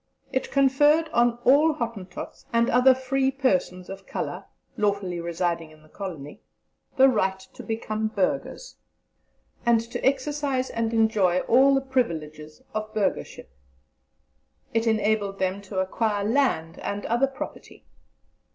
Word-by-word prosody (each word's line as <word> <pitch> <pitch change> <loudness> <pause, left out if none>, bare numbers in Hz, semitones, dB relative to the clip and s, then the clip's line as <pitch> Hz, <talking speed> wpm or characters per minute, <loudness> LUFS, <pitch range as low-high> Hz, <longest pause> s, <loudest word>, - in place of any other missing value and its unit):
"It 260 - -1
conferred 290 +4 +3
on 240 -3 +2
all 295 +5 +5
Hottentots 225 - -6
and 235 0 +2
other 250 +1 +6
free 265 +1 0
persons 185 -9 0
of 195 0 -9
colour - - -4 0.3
lawfully 200 -5 -1
residing 170 -1 -2
in 155 0 -19
the 155 - -21
Colony, 160 -8 -8 0.6
the 265 0 +7
right 190 -7 +1
to 190 - -13
become 220 -1 -3
burghers, 220 - -2 0.9
and 235 -1 +4
to 230 +1 -6
exercise 275 -1 0
and 230 -1 -1
enjoy 215 -6 +2
all 270 +4 +5
the 270 - +2
privileges 155 - -3
of 215 0 -4
burghership. 190 - -2 1.2
It 225 0 +1
enabled 215 -2 +1
them 190 +1 -1
to 195 0 -8
acquire 205 +2 0
land 210 - 0
and 200 0 -4
other 240 +4 +2
property. 270 - -9
220 Hz, 130 wpm, -25 LUFS, 190-260 Hz, 1.2 s, the